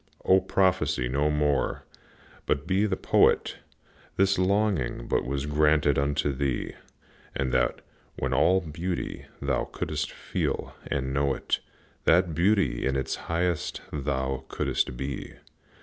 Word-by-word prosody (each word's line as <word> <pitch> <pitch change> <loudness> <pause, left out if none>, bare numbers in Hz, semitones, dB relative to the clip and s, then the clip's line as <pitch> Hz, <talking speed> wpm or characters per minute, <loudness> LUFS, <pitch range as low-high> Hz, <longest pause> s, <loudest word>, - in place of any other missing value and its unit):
O, 95 +1 +6
prophesy 95 -9 +1
no 70 +4 +1
more, 75 -3 0 0.6
but 70 - 0
be 95 +4 +2
the 95 -2 -1
Poet! - - +3 0.6
This 95 0 +3
longing 100 - +1
was 70 +2 -1
but 75 - -4
granted 75 -2 +3
unto 70 0 0
thee 65 -2 -2 0.6
That, 65 -2 0 0.4
when - - -1
all 95 +1 +4
beauty 85 +2 -4 0.2
thou 70 -3 0
couldst 75 0 -3
feel - - -3
and 65 -2 -2
know 70 -1 +1
it, - - -1 0.5
That 85 0 +4
beauty 90 - +2
in 65 0 +1
its 65 0 -1
highest 85 0 -1
thou 65 -2 -2
couldst 60 - -1
be. 70 0 -5
75 Hz, 125 wpm, -27 LUFS, 70-90 Hz, 0.6 s, O